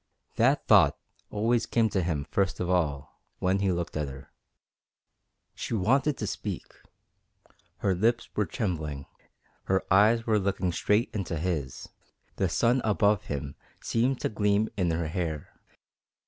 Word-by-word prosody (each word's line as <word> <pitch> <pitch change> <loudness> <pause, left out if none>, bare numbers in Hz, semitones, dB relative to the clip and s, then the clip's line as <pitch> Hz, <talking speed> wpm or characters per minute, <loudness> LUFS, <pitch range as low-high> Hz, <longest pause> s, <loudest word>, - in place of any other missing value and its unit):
That - - +3
thought - - +5 0.3
always 115 +3 +1
came 115 -1 +2
to 95 - 0
him 80 -5 -2
first 95 -1 0
of 90 - -1
all 75 -7 -1 0.2
when 95 +2 +1
he 100 -1 +1
looked 85 -1 -3
at 75 -2 -1
her. 65 0 -10 1.2
She - - -4
wanted 135 +8 +2
to 105 - -3
speak. 100 -2 -4 1.1
Her 95 - +1
lips 115 +6 +1
were 105 -3 +1
trembling, 75 -7 -3 0.6
her 95 0 +1
eyes 110 +4 +5
were 110 -2 +3
looking 95 -2 -1
straight 105 +6 +1
into 95 -5 -3
his, 75 -6 -3 0.5
the 95 - +1
sun 120 +8 +2
above 105 -1 +2
him 70 -1 -4 0.3
seemed 125 +3 0
to - - 0
gleam 105 0 +1
in 90 -4 +1
her 80 0 -1
hair. 80 -3 -4
95 Hz, 145 wpm, -28 LUFS, 85-110 Hz, 1.2 s, thought